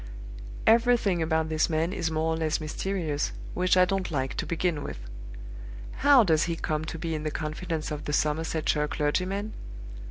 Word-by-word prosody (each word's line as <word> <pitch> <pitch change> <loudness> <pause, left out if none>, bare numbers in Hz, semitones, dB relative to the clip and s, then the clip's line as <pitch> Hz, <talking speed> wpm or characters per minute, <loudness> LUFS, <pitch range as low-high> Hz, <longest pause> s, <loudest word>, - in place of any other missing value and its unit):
"Everything 230 -6 +4
about 160 0 +1
this 155 0 +1
man 165 +3 0
is 165 - -1
more 160 0 0
or - - -2
less 160 -1 0
mysterious, 155 -1 -2 0.2
which 185 0 +2
I 180 - +7
don't 190 0 -1
like, 135 -5 -2
to - - -2
begin 170 -2 -1
with. - - -6 1.0
How 280 -3 +6
does 160 -6 +3
he 170 -1 -2
come 155 -1 -2
to 165 - -5
be 165 0 -3
in 155 - -2
the 155 - -2
confidence 155 +1 -4
of 150 -1 -5
the 150 - -3
Somersetshire 150 0 +1
clergyman? 185 +9 -1
160 Hz, 170 wpm, -27 LUFS, 155-180 Hz, 1.0 s, I